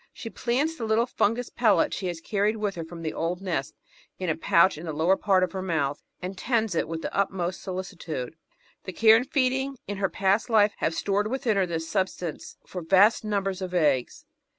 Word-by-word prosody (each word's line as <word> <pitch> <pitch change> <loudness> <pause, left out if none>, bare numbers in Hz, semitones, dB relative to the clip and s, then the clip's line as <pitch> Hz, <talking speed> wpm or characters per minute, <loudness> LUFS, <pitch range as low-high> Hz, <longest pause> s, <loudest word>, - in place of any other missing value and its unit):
She 225 - -8
plants 280 +7 -1
the 230 - -3
little 220 +2 +2
fungus 240 0 0
pellet 220 -5 +3
she 190 - -3
has 175 -2 -4
carried 210 +4 0
with 210 -2 -1
her 170 - -5
from 165 +1 -9
the 155 - -3
old 170 +2 -2
nest 170 -7 -3 0.4
in 185 -2 -3
a - - -1
pouch 170 +3 +4
in 160 +3 -8
the 160 - -3
lower 165 +5 +3
part 195 -2 +2
of 180 - -1
her 190 - -4
mouth, 155 -6 -1 0.2
and 185 +2 -4
tends 225 -1 0
it 165 - 0
with 165 0 -5
the - - -4
utmost 190 -2 -1
solicitude. 170 -7 -5 0.5
The 185 - -6
care 220 +3 +6
and 250 +4 0
feeding 265 0 0
in 205 - -4
her 195 -1 0
past 200 +4 +1
life 215 -2 +4
have 165 - -1
stored 205 +3 0
within 250 -2 0
her 195 -2 +2
the 165 -2 -2
substance 175 -1 -3
for 180 - -6
vast 195 +7 +4
numbers 195 -3 -2
of 180 -1 -4
eggs. 150 - +1
190 Hz, 210 wpm, -26 LUFS, 170-220 Hz, 0.5 s, care